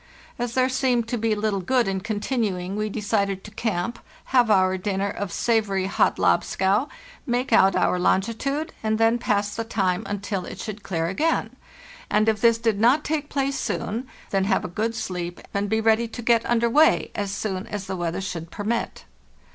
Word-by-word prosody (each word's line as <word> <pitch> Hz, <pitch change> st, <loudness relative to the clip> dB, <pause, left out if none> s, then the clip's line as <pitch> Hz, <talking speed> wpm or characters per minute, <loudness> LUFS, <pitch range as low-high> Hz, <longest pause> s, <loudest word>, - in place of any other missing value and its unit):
As 240 Hz, -1 st, -3 dB
there 255 Hz, 0 st, +4 dB
seemed 255 Hz, -3 st, +1 dB
to 245 Hz, -, -1 dB
be 220 Hz, 0 st, +1 dB
little 205 Hz, -2 st, -1 dB
good 245 Hz, +5 st, +2 dB
in 190 Hz, -1 st, -1 dB
con 210 Hz, +1 st, -3 dB
tinuing, 200 Hz, -7 st, -1 dB
we 215 Hz, 0 st, -1 dB
decided 200 Hz, -2 st, -1 dB
to 210 Hz, -, -10 dB
camp, 215 Hz, -1 st, -2 dB, 0.3 s
have 245 Hz, -3 st, +5 dB
our 185 Hz, -2 st, +4 dB
dinner 195 Hz, +1 st, -1 dB
of 200 Hz, -3 st, -4 dB
savory 210 Hz, -5 st, +1 dB
hot 195 Hz, -, +2 dB
lobscouse, 200 Hz, +8 st, +2 dB, 0.4 s
make 245 Hz, +1 st, 0 dB
out 190 Hz, 0 st, +5 dB
our 180 Hz, -, +2 dB
longitude, 230 Hz, -, 0 dB
and 220 Hz, 0 st, 0 dB
then 225 Hz, +2 st, +3 dB
pass 205 Hz, -2 st, 0 dB
the 230 Hz, -, -2 dB
time 195 Hz, -5 st, 0 dB
until 200 Hz, -1 st, -3 dB
it -, -, -8 dB
should 215 Hz, -1 st, -6 dB
clear 170 Hz, -4 st, -2 dB
again; 300 Hz, -, 0 dB, 0.5 s
and 215 Hz, +1 st, +2 dB
if 215 Hz, -1 st, +1 dB
this 230 Hz, -1 st, +5 dB
did 225 Hz, -3 st, 0 dB
not 250 Hz, +7 st, +4 dB
take 300 Hz, -1 st, -2 dB
place 275 Hz, 0 st, -1 dB
soon, 235 Hz, +5 st, -3 dB, 0.2 s
then 195 Hz, -1 st, +1 dB
have 195 Hz, -1 st, +1 dB
a 180 Hz, -, -7 dB
good 225 Hz, +3 st, -1 dB
sleep 175 Hz, -4 st, -4 dB
and 200 Hz, 0 st, -1 dB
be 220 Hz, +1 st, +2 dB
ready 225 Hz, +1 st, +3 dB
to 235 Hz, +1 st, -8 dB
get 230 Hz, 0 st, +3 dB
under 235 Hz, 0 st, +2 dB
way 300 Hz, +7 st, +4 dB
as 205 Hz, -1 st, -2 dB
soon 195 Hz, -1 st, -3 dB
as 205 Hz, -2 st, -5 dB
the 190 Hz, -, -4 dB
weather 175 Hz, +1 st, -2 dB
should 170 Hz, -3 st, -5 dB
permit. 215 Hz, +6 st, -3 dB
215 Hz, 190 wpm, -24 LUFS, 195-235 Hz, 0.5 s, have